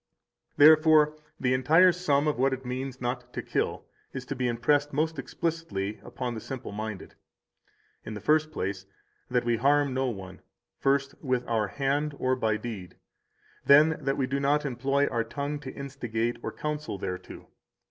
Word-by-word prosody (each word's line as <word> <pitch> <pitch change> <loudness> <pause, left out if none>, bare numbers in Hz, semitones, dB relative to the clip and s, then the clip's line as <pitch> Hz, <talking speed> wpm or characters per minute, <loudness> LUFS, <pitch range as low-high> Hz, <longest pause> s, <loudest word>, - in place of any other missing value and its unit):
188 145 - +8 0.5
Therefore 155 0 -25 0.2
the 130 -1 +1
entire 160 +9 +5
sum 155 -5 +1
of 150 -5 0
what 135 +1 +3
it 130 0 -6
means 130 +1 -4
not 125 0 -3
to - - -5
kill - - -2 0.3
is 130 -1 -5
to 140 - -4
be 125 -1 -1
impressed 140 +5 +1
most 155 +1 0
explicitly 145 -10 -3
upon 125 -2 -4
the 110 - -6
simple 130 -1 -6
minded. 105 -1 -6 0.9
In 110 - -6
the - - -5
first 155 +8 +2
place, 95 -7 -4 0.4
that 125 -1 +1
we 120 -1 +2
harm 140 +2 +3
no 130 0 0
one, 95 -5 -7 0.4
first, 140 0 +1
with 125 -3 0
our 110 -3 +1
hand 140 +5 -1
or 130 0 +1
by 110 -4 0
deed. 110 -5 -7 0.7
Then, 155 +3 +7
that 135 0 0
we 135 - +1
do 140 +2 -2
not 145 +2 +2
employ 135 +2 +1
our 115 -4 0
tongue 145 +3 -4
to 135 -3 -7
instigate 120 -4 -3
or - - -4
counsel 150 -7 -4
thereto. 90 -1 -6
130 Hz, 170 wpm, -28 LUFS, 120-145 Hz, 0.9 s, 188